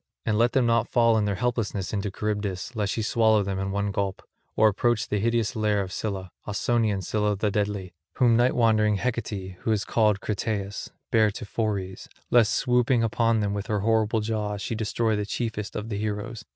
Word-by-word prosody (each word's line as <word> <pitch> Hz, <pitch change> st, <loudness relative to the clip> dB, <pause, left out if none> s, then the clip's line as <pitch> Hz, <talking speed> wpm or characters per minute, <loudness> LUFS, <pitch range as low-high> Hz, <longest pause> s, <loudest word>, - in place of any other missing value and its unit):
And 105 Hz, -, +1 dB
let 120 Hz, +2 st, +3 dB
them 130 Hz, -2 st, +3 dB
not 115 Hz, 0 st, +2 dB
fall 115 Hz, -2 st, +4 dB
in 110 Hz, -1 st, +2 dB
their 100 Hz, -1 st, 0 dB
helplessness 110 Hz, -3 st, -2 dB
into 100 Hz, 0 st, -1 dB
Charybdis 105 Hz, +1 st, -3 dB
lest 105 Hz, -2 st, -1 dB
she 110 Hz, -, -2 dB
swallow 110 Hz, -1 st, +3 dB
them 95 Hz, -1 st, -3 dB
at 95 Hz, 0 st, -2 dB
one 100 Hz, +1 st, -1 dB
gulp, 100 Hz, -1 st, -2 dB, 0.3 s
or 110 Hz, -, +5 dB
approach 120 Hz, +2 st, +1 dB
the 105 Hz, -, -1 dB
hideous 115 Hz, +2 st, 0 dB
lair 105 Hz, -2 st, +1 dB
of 95 Hz, -2 st, -3 dB
Scylla, 95 Hz, -4 st, -4 dB, 0.2 s
Ausonian 105 Hz, -2 st, 0 dB
Scylla 105 Hz, +2 st, 0 dB
the 105 Hz, +1 st, 0 dB
deadly, 100 Hz, -3 st, -2 dB, 0.2 s
whom 120 Hz, -3 st, +4 dB
night 120 Hz, +2 st, +3 dB
wandering 110 Hz, -3 st, +3 dB
Hecate, 100 Hz, -5 st, -3 dB
who 110 Hz, -, -1 dB
is 105 Hz, -2 st, 0 dB
called 105 Hz, -3 st, +2 dB
Crataeis, 100 Hz, -1 st, -3 dB, 0.2 s
bare 110 Hz, -1 st, +4 dB
to 110 Hz, +2 st, -7 dB
Phoreys, 100 Hz, -3 st, -3 dB, 0.2 s
lest 115 Hz, -3 st, +4 dB
swooping 125 Hz, -1 st, +2 dB
upon 115 Hz, 0 st, +2 dB
them 100 Hz, -1 st, -1 dB
with 100 Hz, 0 st, -4 dB
her 105 Hz, -2 st, 0 dB
horrible 110 Hz, 0 st, +2 dB
jaws 105 Hz, -1 st, -2 dB
she 110 Hz, -, -3 dB
destroy 110 Hz, 0 st, 0 dB
the 105 Hz, -, -1 dB
chiefest 105 Hz, -1 st, -4 dB
of 110 Hz, +2 st, -4 dB
the 100 Hz, -2 st, -3 dB
heroes. 105 Hz, +2 st, -4 dB
105 Hz, 195 wpm, -26 LUFS, 100-115 Hz, 0.3 s, or